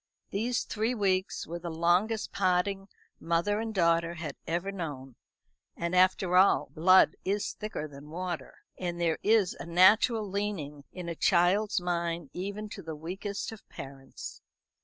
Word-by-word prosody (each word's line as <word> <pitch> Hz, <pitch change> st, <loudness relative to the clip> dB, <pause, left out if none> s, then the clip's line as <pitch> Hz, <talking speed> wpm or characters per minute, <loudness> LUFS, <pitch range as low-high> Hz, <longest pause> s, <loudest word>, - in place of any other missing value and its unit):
These 235 Hz, +5 st, 0 dB
three 225 Hz, +3 st, -1 dB
weeks 190 Hz, -3 st, 0 dB
were 170 Hz, +1 st, -6 dB
the 170 Hz, 0 st, -5 dB
longest 175 Hz, +7 st, +1 dB
parting 195 Hz, +1 st, +1 dB, 0.3 s
mother 170 Hz, +5 st, +1 dB
and 225 Hz, 0 st, -3 dB
daughter 170 Hz, -3 st, +2 dB
had 160 Hz, -4 st, -5 dB
ever 175 Hz, +4 st, -1 dB
known; 145 Hz, -9 st, -6 dB, 0.6 s
and 170 Hz, +1 st, -2 dB
after 185 Hz, 0 st, +3 dB
all, 190 Hz, +2 st, +4 dB
blood 185 Hz, +4 st, +5 dB
is 200 Hz, +2 st, -1 dB
thicker 210 Hz, -7 st, -5 dB
than 145 Hz, 0 st, -12 dB
water; 175 Hz, +1 st, -5 dB, 0.2 s
and 175 Hz, -1 st, -3 dB
there 165 Hz, -2 st, +1 dB
is 210 Hz, -3 st, +3 dB
a -, -, -7 dB
natural 205 Hz, +5 st, +5 dB
leaning 185 Hz, -8 st, -4 dB
in 180 Hz, -2 st, -7 dB
a 170 Hz, -, -2 dB
child's 185 Hz, +5 st, +3 dB
mind 170 Hz, -4 st, -2 dB
even 200 Hz, +3 st, -4 dB
to 200 Hz, -, -8 dB
the 160 Hz, -3 st, -6 dB
weakest 195 Hz, +8 st, -5 dB
of 225 Hz, -, -10 dB
parents. 135 Hz, -1 st, -9 dB
180 Hz, 150 wpm, -29 LUFS, 170-200 Hz, 0.6 s, blood